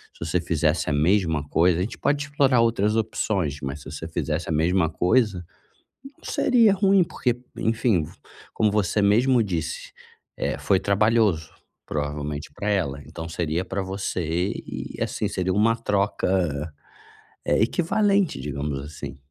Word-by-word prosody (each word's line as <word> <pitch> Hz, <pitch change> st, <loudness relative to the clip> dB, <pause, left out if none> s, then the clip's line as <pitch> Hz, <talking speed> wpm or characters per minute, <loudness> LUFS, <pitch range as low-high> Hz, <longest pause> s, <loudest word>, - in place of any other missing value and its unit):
se -, -, -20 dB
você 85 Hz, +3 st, 0 dB
fizesse 80 Hz, -1 st, 0 dB
a -, -, +1 dB
mesma 80 Hz, -1 st, +2 dB
coisa 85 Hz, +1 st, +3 dB
a -, -, +1 dB
gente 110 Hz, +5 st, -4 dB
pode 145 Hz, 0 st, 0 dB
explorar 140 Hz, -4 st, +3 dB
outras 110 Hz, -2 st, +2 dB
opções, 100 Hz, -8 st, -1 dB
mas 70 Hz, +2 st, -5 dB
se -, -, -9 dB
você 80 Hz, -, -6 dB
fizesse 80 Hz, 0 st, -3 dB
a -, -, -2 dB
mesma 80 Hz, +2 st, +2 dB
coisa, 90 Hz, +1 st, +1 dB, 0.7 s
não -, -, -19 dB
seria 230 Hz, -6 st, +4 dB
ruim, 195 Hz, -1 st, +4 dB
porque, 125 Hz, -6 st, -2 dB, 0.2 s
enfim, 110 Hz, -6 st, +1 dB
v -, -, -9 dB, 0.4 s
como 110 Hz, -1 st, +2 dB
você 105 Hz, 0 st, +1 dB
mesmo 120 Hz, +5 st, +4 dB
disse, 85 Hz, -6 st, -3 dB, 0.4 s
eh, -, -, -2 dB
foi 95 Hz, -2 st, +2 dB
trabalhoso, 105 Hz, -4 st, +2 dB, 0.4 s
provavelmente 75 Hz, 0 st, -4 dB
pra 105 Hz, -, -3 dB
ela, 70 Hz, -9 st, 0 dB
então 80 Hz, +1 st, -7 dB
seria 85 Hz, +1 st, -2 dB
pra 95 Hz, +1 st, -3 dB
você 95 Hz, -1 st, -3 dB, 0.4 s
e, -, -, -6 dB
assim, -, -, -1 dB
seria 95 Hz, 0 st, -1 dB
uma 110 Hz, +3 st, +3 dB
troca, 95 Hz, -8 st, 0 dB, 0.7 s
eh, -, -, +2 dB
equivalente, 200 Hz, -, +1 dB
digamos 70 Hz, -1 st, -3 dB
assim. 70 Hz, -1 st, -8 dB
95 Hz, 150 wpm, -24 LUFS, 80-110 Hz, 0.7 s, seria